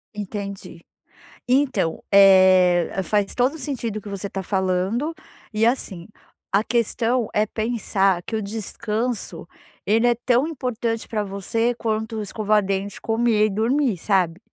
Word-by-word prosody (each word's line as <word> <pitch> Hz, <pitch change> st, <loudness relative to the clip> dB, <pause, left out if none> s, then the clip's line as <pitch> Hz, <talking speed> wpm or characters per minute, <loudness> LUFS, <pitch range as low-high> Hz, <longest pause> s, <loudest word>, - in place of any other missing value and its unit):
Entendi. 200 Hz, -1 st, -7 dB, 0.6 s
Então, 250 Hz, -, +1 dB
eh, 185 Hz, -3 st, +6 dB
faz 205 Hz, 0 st, 0 dB
todo 255 Hz, +5 st, +1 dB
o -, -, -7 dB
sentido 255 Hz, -7 st, -3 dB
o -, -, -6 dB
que 205 Hz, -, -12 dB
você 200 Hz, 0 st, -4 dB
está 195 Hz, -1 st, -5 dB
falando. 190 Hz, -, -1 dB, 0.4 s
E 215 Hz, +1 st, +2 dB
assim, 200 Hz, -8 st, -1 dB, 0.4 s
a 200 Hz, +2 st, +3 dB
questão 235 Hz, 0 st, 0 dB
é 210 Hz, -, +2 dB
pensar 205 Hz, -5 st, 0 dB
que 225 Hz, -, -5 dB
o 220 Hz, -, -1 dB
descanso 220 Hz, +3 st, -4 dB, 0.4 s
ele 225 Hz, +3 st, +3 dB
é 240 Hz, -, +5 dB
tão 250 Hz, +4 st, +3 dB
importante 240 Hz, -6 st, -3 dB
pra 215 Hz, -2 st, -2 dB
você 205 Hz, +4 st, -1 dB
quanto 220 Hz, -1 st, -2 dB
escovar 210 Hz, 0 st, +1 dB
dente, 195 Hz, +1 st, -3 dB
comer 225 Hz, -1 st, +2 dB
e -, -, +1 dB
dormir, 230 Hz, +2 st, +1 dB
sabe. 180 Hz, -2 st, 0 dB
215 Hz, 140 wpm, -22 LUFS, 195-235 Hz, 0.6 s, eh